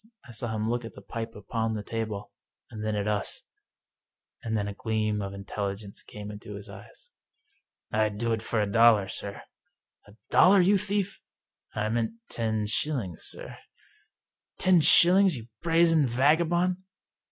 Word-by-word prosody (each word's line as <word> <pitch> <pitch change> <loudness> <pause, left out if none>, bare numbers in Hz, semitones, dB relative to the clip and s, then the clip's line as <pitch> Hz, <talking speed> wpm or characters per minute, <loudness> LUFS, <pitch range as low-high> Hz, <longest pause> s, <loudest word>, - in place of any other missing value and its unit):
I - - -11
saw 110 -1 -4
him 110 0 -1
look 120 +1 -1
at 115 -3 -9
the - - -11
pipe 115 +2 -6
upon 110 +2 -2
the 105 - -4
table, 110 -2 -4 0.4
and 110 -1 -7
then 110 -1 -1
at 105 0 -2
us, 105 -2 -2 1.0
and 110 -1 -2
then 100 -1 -1
a 100 - -4
gleam 110 0 -1
of 100 -1 -4
intelligence 100 0 -5
came 105 0 -9
into 105 0 -9
his 100 0 -9
eyes. - - -14 0.4
" - - -44
I'd 105 -1 0
do 115 +2 -1
it 110 - -2
for 115 0 -1
a 105 - +2
dollar, 110 -1 +5
sir." 100 +1 -6 0.6
"A 100 - -16 0.2
dollar, 195 +2 +6
you 195 +2 +4
thief?" 200 -1 -2 0.3
" - - -35
I 105 0 0
meant 115 - -1 0.2
ten 110 -2 -1
shillings, 110 - -2
sir." - - -6 0.5
" - - -63
Ten 185 -3 +4
shillings, 180 +2 +6
you 115 0 -10
brazen 165 -3 +4
vagabond? 170 +8 +2
110 Hz, 165 wpm, -27 LUFS, 105-150 Hz, 1.0 s, dollar